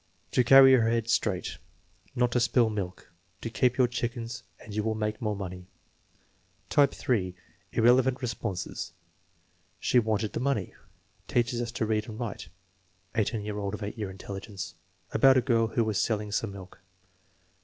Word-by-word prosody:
"To 125 - +3
carry 135 +2 +8
her 115 -3 +4
head 115 -1 0
straight." 105 -5 0 0.6
"Not 125 -1 +2
to 125 - +2
spill 120 -1 +3
milk." 95 -5 -5 0.3
"To 115 - -4
keep 125 +1 +2
your 130 -2 +5
chickens 120 -1 -4 0.2
and 105 - -11
you 105 - 0
will 110 +1 -1
make 105 +2 -2
more 105 -2 -1
money." 90 -2 -7 1.0
Type 140 -2 +5
(3), 95 -8 -1 0.4
irrelevant 125 +2 +4
responses: 115 -7 -4 0.9
"She 125 - +3
wanted 110 -2 -1
the - - -2
money." 130 -8 -1 0.5
"Teaches 120 0 +1
us 120 -1 -3
to 110 - -1
read 110 +1 -1
and 110 +1 -8
write" 115 -5 -5 0.6
(18 110 -1 0
year 105 -1 -3
old 100 0 -2
of 105 - -7
8 100 - -4
year 105 -3 -4
intelligence). 95 0 -7 0.4
"About 135 -1 +6
a - - +7
girl 115 -2 +2
who 115 +1 +1
was 110 -1 0
selling 105 -2 -1
some 110 0 -1
milk." 95 -1 -11
110 Hz, 165 wpm, -28 LUFS, 105-120 Hz, 1.0 s, carry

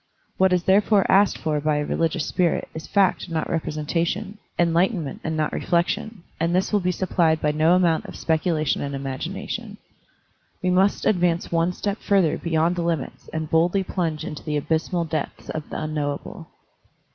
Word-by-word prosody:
What 190 0 +4
is 180 -1 +2
therefore 200 +1 +4
asked 200 0 +4
for 150 -2 -1
by 155 0 +1
a 150 0 0
religious 165 0 0
spirit 175 -3 0
is 160 - -7
fact 195 -2 +2
and 170 - -9
not 160 - -1
representation, 170 +6 -2 0.2
enlightenment 170 - +1
and 160 -1 -2
not 155 -1 0
reflection; 175 +3 -1 0.2
and 165 +2 +1
this 190 +3 0
will 205 - +4
be 180 -1 0
supplied 170 -3 +1
by 150 - +1
no 155 +3 +4
amount 170 -3 +2
of - - -9
specu 160 +2 0
lation 155 -3 0
and 140 0 -3
imagination. 135 -1 -5 0.9
We 180 - +2
must 190 +2 +2
advance 175 -4 +1
one 170 +1 +2
step 200 +3 -3
ftuther 190 -6 +2
beyond 170 +1 +1
the - - 0
limits 165 -5 -3
and 160 0 -3
boldly 170 +5 +2
plunge 165 -5 -2
into 150 - -6
the 150 -1 -1
abysmal 165 +3 0
depths 155 -2 -4
of 155 -1 -6
the - - -4
Unknowable. 150 -2 -4
165 Hz, 175 wpm, -23 LUFS, 155-180 Hz, 0.9 s, What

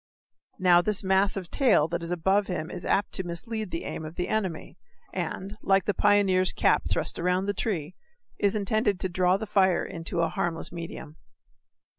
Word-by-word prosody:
Now, 180 -1 +5
this 205 +2 +1
mass 190 +1 +2
of 180 -3 -6
tail 245 - +3
that 170 +1 -2
is 170 +1 -5
above 190 +4 +1
him 175 -2 -4
is 175 - -6
apt 200 - +1
to 190 - +2
mislead 210 +5 -5
the 165 - -4
aim - - -5
of 155 +1 -8
the 180 - -3
enemy, 190 -7 -3 0.3
and, 195 +3 -4
like 195 -2 +2
the 205 - +1
pioneer's 190 -3 +3
cap - - +2
thrust - - -1
around 180 +2 +1
the 205 - -1
tree, 185 -6 -3 0.5
is 205 +1 +2
intended 210 -1 +1
to 185 - -1
draw 180 +1 +2
the 220 - -5
fire 190 -3 +2
into 170 0 -2
a 165 - +2
harmless 165 0 -2
medium. 165 -2 -8
185 Hz, 185 wpm, -27 LUFS, 170-200 Hz, 0.5 s, Now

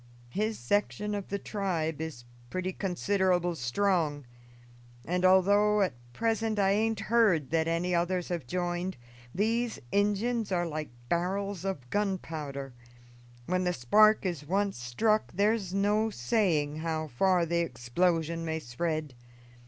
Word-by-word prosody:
His 215 - -1
section 205 +8 -1
of 200 -2 -4
the 200 - -2
tribe 170 -7 -2
is 160 -7 -6 0.3
pretty 185 +3 -2
considerable 185 -2 +1
strong, 155 +1 0 0.8
and 180 +2 -1
although 205 +3 +5
at 185 - -1 0.2
present 225 - 0
I 195 -1 +3
aint 220 +1 +1
heard 215 - +2
that 160 0 +2
any 170 +2 0
others 175 +1 0
have 170 -8 -3
joined, 175 +3 -2 0.4
these 230 +4 0
Injuns 210 +2 +1
are 175 -1 +1
like 155 -2 -4 0.2
barrels 185 +3 -1
of 150 -11 -3
gunpowder: 155 -9 -3 0.7
when 185 +4 0
the 180 0 +1
spark 215 - +4
is 170 -6 -2
once 195 +2 -1
struck 215 - +1
there's 205 -1 +1
no 205 +3 +2
saying 155 - 0
how 160 -1 -2
far 175 +7 +2
the 170 +1 0
explosion 165 +5 0
may 160 -1 -2
spread. 155 +2 -3
180 Hz, 130 wpm, -29 LUFS, 160-205 Hz, 0.8 s, although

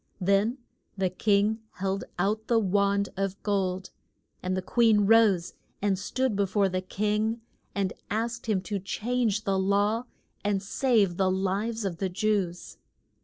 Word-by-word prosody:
Then 200 +6 +2 0.4
the 190 -2 0
king 205 +3 +2
held 195 +1 -2
out 210 +4 0
the 235 - +3
wand 200 -1 +2
of 195 0 -2
gold, 190 -2 -1 0.5
and 185 0 -1
the - - -1
queen 225 0 +4
rose, 205 -4 +4 0.3
and 195 -2 +1
stood 255 +3 -1
be 200 0 +1
fore 195 +1 +2
the 185 0 -1
king 215 +4 -1 0.3
and 195 -2 0 0.2
asked 230 +3 -2
him 205 -4 +1
to 205 +1 -3
change 220 +2 -1
the 195 -2 +1
law 205 +4 +1 0.4
and 200 -1 0
save 205 -4 +2
the 190 -1 +2
lives 200 +4 -1
of 180 -4 -2
the 190 +1 -1
Jews. 185 -2 -1
200 Hz, 150 wpm, -27 LUFS, 190-220 Hz, 0.5 s, queen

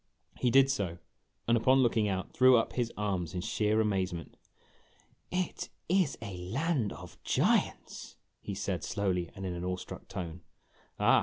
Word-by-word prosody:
He 125 - +3
did 135 +2 +6
so, 95 -10 -2 0.5
and, 115 - +5
upon 130 +3 +4
looking 115 -3 +2
out, 95 -1 -3
threw 130 0 +7
up 115 - 0
his 120 -2 -1
arms 95 -5 -2
in 90 - -1
sheer 110 +1 +1
amazement. 95 -5 -1 1.0
"It 180 -1 -2 0.2
is 180 -4 +2
a 100 -4 -6
land 120 - 0
of - - -11
giants! - - 0
" - - -49
he - - -5
said, - - -2
slowly 90 -4 -1
and 95 - -6
in 90 - -2
an 85 0 -5
awe 90 0 -1
struck - - -9
tone. 90 -3 -6 0.6
"Ah!" - - +6
105 Hz, 165 wpm, -31 LUFS, 90-125 Hz, 1.0 s, threw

